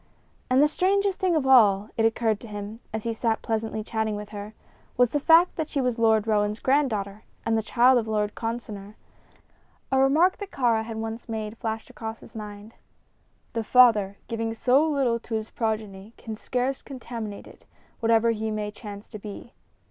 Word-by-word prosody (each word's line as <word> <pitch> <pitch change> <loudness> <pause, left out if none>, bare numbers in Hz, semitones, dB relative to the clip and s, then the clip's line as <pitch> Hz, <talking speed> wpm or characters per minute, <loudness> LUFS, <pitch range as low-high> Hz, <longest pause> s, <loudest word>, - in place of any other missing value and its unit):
And 260 +3 +5
the - - +6
strangest 390 +5 +1
thing 370 -4 +2
of 300 -4 +1
all, 215 -6 +5
it 225 - +2
occurred 225 -2 +1
to 235 - -11
him, 210 +1 -7
as 220 -1 -4
he 230 - -1
sat 225 0 -1
pleasantly 220 -1 -2
chatting 220 -1 -2
with 210 0 -7
her, 210 0 -8 0.4
was 245 -2 +4
the 290 - +1
fact 330 +5 +5
that 315 -2 -2
she 285 - -2
was 250 -3 0
Lord 220 -2 +3
Roane's 210 -1 +1
granddaughter 220 -8 0 0.2
and 225 - +1
the 220 - +2
child 245 +3 +4
of 225 - -4
Lord 210 -1 0
Consinor. 215 -3 -5 1.0
A 265 - +3
remark 305 +8 +4
that 405 -2 -7
Kāra 235 - +1
had 225 0 -6
once 225 +2 -5
made 220 -1 -4
flashed 225 -1 -5
across 225 0 -6
his - - -15
mind: 210 0 -9 0.8
"The 230 - -1
father, 215 -5 +5
giving 225 0 -3
so 255 +5 +3
little 260 -6 +1
to 230 0 -5
his 220 0 -4
progeny, 215 -2 -4
can 220 -2 -7
scarce 255 +4 -2
contaminate 235 -6 -7
it, - - -16 0.3
whatever 230 0 +3
he 220 0 -2
may 210 -1 -3
chance 205 -1 -10
to 215 - -8
be." 210 +3 -9
225 Hz, 185 wpm, -26 LUFS, 215-250 Hz, 1.0 s, the